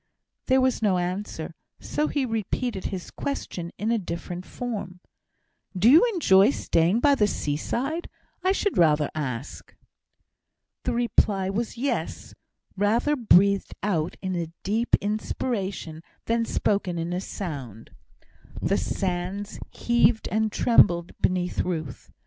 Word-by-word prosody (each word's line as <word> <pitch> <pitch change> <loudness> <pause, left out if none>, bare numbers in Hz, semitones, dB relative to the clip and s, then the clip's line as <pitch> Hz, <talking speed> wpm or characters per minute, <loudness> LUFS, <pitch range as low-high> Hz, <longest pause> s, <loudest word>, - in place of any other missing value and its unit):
There 260 0 +4
was 260 -2 +1
no 200 -4 +3
answer, 180 +4 -3 0.3
so 300 - -1
he 285 -3 0
repeated 225 -1 -2
his 185 -3 -5
question 175 -11 -4
in 220 +3 -1
a 230 - +2
different 175 0 -6
form. 205 -7 -5 0.8
"Do 220 +7 +6
you 320 - +8
enjoy 205 - +5
staying 185 -4 +1
by 290 -1 +5
the 215 -7 +3
seaside? 240 - -2 0.3
I 375 - +3
should 395 0 0
rather 150 -3 +4
ask." 135 -4 -5 1.1
The 250 - 0
reply 205 -5 +1
was 230 +4 -3
"Yes," 270 +4 -3 0.4
rather 225 +9 +2
breathed 200 -5 +3
out 175 -6 -1
in 185 -1 -2
a 165 -2 -3
deep 225 +4 +2
inspiration 200 -5 -3 0.2
than 230 0 +1
spoken 200 -5 0
in 165 +1 -2
a 180 - -2
sound. 135 - -7 0.7
The - - +1
sands 190 +2 -3
heaved 235 -2 +2
and 220 0 +1
trembled 175 -8 +4
beneath 180 -1 0
Ruth. 160 -7 -3
200 Hz, 125 wpm, -25 LUFS, 175-235 Hz, 1.1 s, you